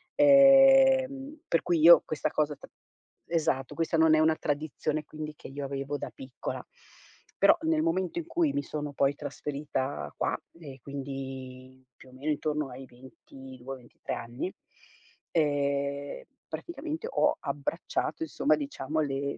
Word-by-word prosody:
Ehm, 270 Hz, 0 st, +6 dB
per 165 Hz, -, +2 dB
cui, 175 Hz, -1 st, +1 dB
io 170 Hz, +2 st, +9 dB
questa 155 Hz, -, -2 dB
cosa 150 Hz, -1 st, 0 dB
tr -, -, -14 dB, 0.6 s
esatto, 155 Hz, -6 st, 0 dB
questa 165 Hz, 0 st, 0 dB
non 160 Hz, 0 st, +5 dB
è -, -, +3 dB
una 160 Hz, 0 st, +4 dB
tradizione, 155 Hz, 0 st, -2 dB
quindi, 155 Hz, 0 st, -7 dB
che -, -, -11 dB
io 140 Hz, +1 st, -6 dB
avevo 140 Hz, +1 st, -3 dB
da -, -, -5 dB
piccola, 130 Hz, -1 st, -6 dB, 0.7 s
però, -, -, +6 dB
nel 320 Hz, -1 st, +2 dB
momento 190 Hz, -, 0 dB
in 335 Hz, -, -6 dB
cui 330 Hz, -3 st, +1 dB
mi 285 Hz, -, -1 dB
sono 150 Hz, -1 st, -5 dB
poi 140 Hz, 0 st, +2 dB
trasferita 145 Hz, -1 st, -4 dB
qua -, -, 0 dB, 0.2 s
e 140 Hz, -5 st, -10 dB
quindi, 130 Hz, -2 st, -7 dB
più 130 Hz, -, -17 dB
o -, -, -17 dB
meno 140 Hz, +4 st, -2 dB
intorno 150 Hz, -1 st, -1 dB
ai 130 Hz, +1 st, -9 dB
22, 130 Hz, +1 st, -11 dB
23 120 Hz, -2 st, -8 dB
anni, 120 Hz, +11 st, -5 dB, 0.8 s
ehm, 140 Hz, -, 0 dB, 0.2 s
praticamente, 325 Hz, +4 st, -5 dB
ho -, -, +2 dB
abbracciato, -, -, -3 dB
insomma, 310 Hz, -2 st, +2 dB
diciamo, 160 Hz, -, -3 dB
le 140 Hz, -1 st, -2 dB
150 Hz, 140 wpm, -29 LUFS, 135-190 Hz, 0.8 s, io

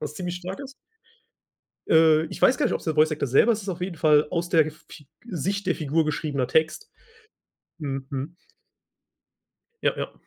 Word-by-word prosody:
was 150 Hz, -, -5 dB
ziemlich 180 Hz, -1 st, -4 dB
stark 185 Hz, +6 st, -7 dB
ist. 275 Hz, -1 st, -9 dB, 1.2 s
Äh, 160 Hz, -1 st, +5 dB
ich -, -, -9 dB
weiß 255 Hz, -, +5 dB
gar 295 Hz, -, +1 dB
nicht, -, -, 0 dB
ob's -, -, -3 dB
der 160 Hz, -, -1 dB
Voice 155 Hz, +1 st, +4 dB
Actor 150 Hz, -2 st, -2 dB
selber, 140 Hz, -, +4 dB
es 220 Hz, -, -1 dB
ist 195 Hz, -, -6 dB
auf 180 Hz, 0 st, -5 dB
jeden 180 Hz, -2 st, -3 dB
Fall 150 Hz, -2 st, +4 dB
aus 175 Hz, 0 st, -2 dB
der 160 Hz, -3 st, +3 dB
Fi 155 Hz, -2 st, -16 dB, 0.2 s
Sicht 195 Hz, +1 st, -3 dB
der 180 Hz, -, +2 dB
Figur 155 Hz, +1 st, 0 dB
geschriebener 145 Hz, -4 st, -2 dB
Text. 160 Hz, -, 0 dB, 0.9 s
Mhm, 135 Hz, -3 st, -4 dB
mhm. 140 Hz, +5 st, -5 dB, 1.5 s
Ja, -, -, +2 dB
ja. -, -, -4 dB
160 Hz, 180 wpm, -25 LUFS, 150-180 Hz, 1.5 s, Äh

